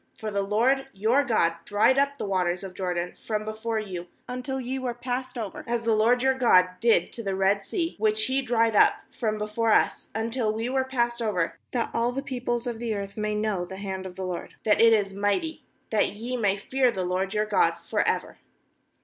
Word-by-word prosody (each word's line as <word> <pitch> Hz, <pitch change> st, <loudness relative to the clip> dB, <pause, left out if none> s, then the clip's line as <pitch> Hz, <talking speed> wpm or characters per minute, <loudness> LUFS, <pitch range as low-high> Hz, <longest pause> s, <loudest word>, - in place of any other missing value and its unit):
^For 215 Hz, -1 st, -5 dB
the 200 Hz, -, +1 dB
LORD 245 Hz, +7 st, +2 dB
your 225 Hz, +8 st, +2 dB
God 170 Hz, -10 st, +2 dB
dried 220 Hz, +8 st, +3 dB
up 280 Hz, 0 st, +1 dB
the -, -, -3 dB
waters 185 Hz, -2 st, 0 dB
of 190 Hz, -1 st, -7 dB
Jordan 180 Hz, -2 st, -2 dB
from 215 Hz, -1 st, -4 dB
before 220 Hz, +1 st, -3 dB
you, 180 Hz, -4 st, -6 dB, 0.2 s
until 255 Hz, +2 st, -4 dB
ye 260 Hz, +1 st, -3 dB
were 250 Hz, -2 st, -3 dB
passed 250 Hz, +1 st, -4 dB
over, 215 Hz, -5 st, -5 dB
as 235 Hz, 0 st, -1 dB
the 230 Hz, -1 st, +2 dB
LORD 235 Hz, +3 st, +3 dB
your 265 Hz, 0 st, +4 dB
God 205 Hz, -8 st, +5 dB
did 230 Hz, +2 st, +3 dB
to 235 Hz, -, -5 dB
the 195 Hz, -3 st, -2 dB
Red 195 Hz, +1 st, +2 dB
Sea, 340 Hz, -3 st, -2 dB
which 215 Hz, 0 st, +3 dB
He 265 Hz, +3 st, +1 dB
dried 230 Hz, -3 st, +1 dB
up -, -, +6 dB, 0.2 s
from 215 Hz, -3 st, -2 dB
before 215 Hz, +2 st, 0 dB
us, -, -, +2 dB
until 225 Hz, 0 st, 0 dB
we 225 Hz, +2 st, -3 dB
were 265 Hz, 0 st, +1 dB
passed 240 Hz, -2 st, -1 dB
over, 190 Hz, -7 st, -1 dB
^hat 240 Hz, -2 st, -1 dB
all 235 Hz, +1 st, +1 dB
the 270 Hz, +2 st, -4 dB
peoples 245 Hz, -2 st, -2 dB
of 235 Hz, -2 st, -4 dB
the 230 Hz, -2 st, -2 dB
earth 200 Hz, -1 st, -5 dB
may, 215 Hz, 0 st, -1 dB
know 210 Hz, -4 st, -1 dB
the 190 Hz, +2 st, -8 dB
hand 190 Hz, -1 st, -5 dB
of 180 Hz, -, -10 dB
the 190 Hz, 0 st, -4 dB
LORD, 180 Hz, -2 st, -5 dB
that 215 Hz, 0 st, +3 dB
it 230 Hz, 0 st, +7 dB
is' 205 Hz, -3 st, +2 dB
mighty; 205 Hz, +11 st, -1 dB, 0.3 s
that 215 Hz, -, +3 dB
ye 235 Hz, +5 st, -4 dB
may 205 Hz, -5 st, +1 dB
fear 255 Hz, +5 st, +1 dB
the 185 Hz, -5 st, -3 dB
LORD 185 Hz, +2 st, -1 dB
your 210 Hz, 0 st, +2 dB
God 215 Hz, -, +2 dB
for -, -, -4 dB
ever.' -, -, -1 dB
220 Hz, 215 wpm, -26 LUFS, 200-245 Hz, 0.3 s, it